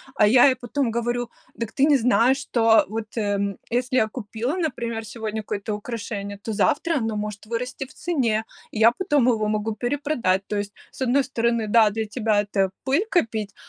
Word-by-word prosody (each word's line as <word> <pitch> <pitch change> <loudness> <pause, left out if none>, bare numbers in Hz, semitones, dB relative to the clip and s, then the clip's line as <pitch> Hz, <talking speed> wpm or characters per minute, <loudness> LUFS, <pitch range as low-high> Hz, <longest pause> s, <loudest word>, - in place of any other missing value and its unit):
А 210 - +5
я 245 +5 +7
ей 260 - +3
потом 250 0 -2
говорю: 240 +1 -2 0.3
"Дак 230 -2 -4
ты 275 +4 +3
не 290 -2 +5
знаешь, 250 +2 +3
что 230 -5 +3
вот, 220 +1 -6
э, 200 -2 0 0.2
если 250 +1 0
я 220 - +3
купила, 230 - -4
например, 235 -9 -3
сегодня 220 0 -4
какое-то 210 0 -4
украшение, 205 -2 -5
то 220 +2 -5
завтра 300 - +1
оно 225 -3 -2
может 210 0 -5
вырасти 250 +3 -4
в 295 - -17
цене, 250 -12 0 0.3
и 215 - -5
я 225 +1 +7
потом 290 -4 +1
его 220 -4 +2
могу 215 +1 -1
перепродать". 245 -6 0
То 210 - -2
есть, 205 0 -4 0.2
с - - -14
одной 260 +2 +3
стороны, 235 -3 0
да, 220 0 +5
для 220 +1 -3
тебя 215 -1 +1
это 195 -2 0
пыль 285 +11 +1
копить, 220 - 0
230 Hz, 190 wpm, -23 LUFS, 210-255 Hz, 0.3 s, я